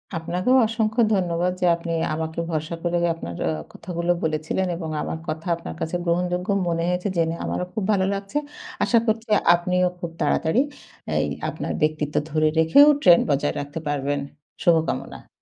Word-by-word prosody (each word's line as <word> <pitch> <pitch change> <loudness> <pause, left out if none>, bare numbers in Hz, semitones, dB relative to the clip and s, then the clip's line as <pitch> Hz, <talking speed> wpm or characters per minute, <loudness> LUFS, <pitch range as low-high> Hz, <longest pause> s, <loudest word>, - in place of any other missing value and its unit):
আপনাকেও 180 +9 +1
অসংখ্য 220 +1 0
ধন্যবাদ 180 -2 +1
যে - - +3
আপনি 170 0 -6 0.2
আমাকে 160 +1 -3
ভরসা 155 +1 -2
করে 175 0 +1 0.2
আপনার 85 - -7
আ - - +1 0.2
কথাগুলো 170 0 -2
বলেছিলেন 155 +4 -1
এবং 165 -2 -5
আমার - - -3
কথা 160 +3 -4
আপনার 80 - -8
কাছে 160 - -2
গ্রহণযোগ্য 180 +1 0 0.2
মনে 165 -1 0
হয়েছে 180 +2 -1
জেনে 165 -1 +1
আমারও 180 - -2
খুব 220 - -2
ভালো 190 -2 +2
লাগছে। 200 +8 -4 0.5
আশা 235 - +3
করছি 225 +1 -1 0.3
আপনিও 180 +1 +1
খুব 170 -1 -5
তাড়াতাড়ি 160 +9 +2 0.6
এই - - +1 0.2
আপনার - - -4
ব্যক্তিত্ব 155 -1 0
ধরে 155 0 +2
রেখেও 165 - +7
trend 175 -7 +6
বজায় 145 0 +1
রাখতে 145 +2 -5
পারবেন। 145 0 -1 0.4
শুভকামনা। 165 -2 0
170 Hz, 155 wpm, -23 LUFS, 160-180 Hz, 0.6 s, রেখেও